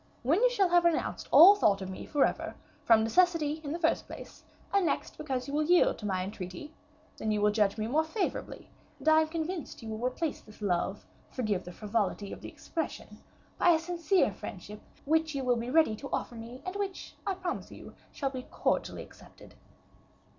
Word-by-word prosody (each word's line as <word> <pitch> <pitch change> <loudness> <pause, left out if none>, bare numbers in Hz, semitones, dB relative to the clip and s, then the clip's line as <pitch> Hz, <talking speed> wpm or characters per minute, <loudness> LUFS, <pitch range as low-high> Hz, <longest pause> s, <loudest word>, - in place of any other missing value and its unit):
"When 315 - +2
you - - +6
shall 405 -7 +2
have 350 0 +4
renounced 340 -2 0
all 370 +5 +10
thought 210 - +2
of 190 -1 -6
me 185 - -8
forever, 290 -2 0 0.3
from 225 -1 +5
necessity 315 +3 +2
in 285 - -4
the 330 - -2
first 330 -2 +1
place, - - -11 0.3
and, 400 -1 +4
next, - - -2
because 265 -4 -3
you 280 - -6
will 300 - +2
yield 350 +3 +3
to 210 - -4
my 185 -2 -1
entreaty, 195 - -7 0.4
then 220 - -3
you 210 -1 +1
will 210 0 +3
judge 210 -1 +1
me 215 - -2
more 295 +8 +2
favorably, 370 +5 -4 0.3
and - - -10
I 315 0 +7
am 315 - 0
convinced 320 -4 -5
you 225 - -6
will 220 +2 -5
replace 300 +5 -3
this 215 - -17
love 190 0 -1 0.2
forgive 215 -7 -2
the 180 - -7
frivolity 205 0 -2
of - - -10
the - - -7
expression 325 -2 -6 0.4
by 350 - +6
a - - +4
sincere 335 - +1
friendship, 205 +3 -9 0.2
which 315 0 +1
you 270 - -2
will 250 -1 +2
be 235 +1 -4
ready 310 -6 +4
to 275 +4 -8
offer - - -2
me, 235 +2 -9
and 370 +1 -4
which, 395 -2 -4
I 390 - 0
promise 360 -1 -4
you, - - -11 0.2
shall 275 -2 -2
be 255 -2 -7
cordially - - -1
accepted." - - -16
280 Hz, 200 wpm, -30 LUFS, 215-330 Hz, 0.4 s, all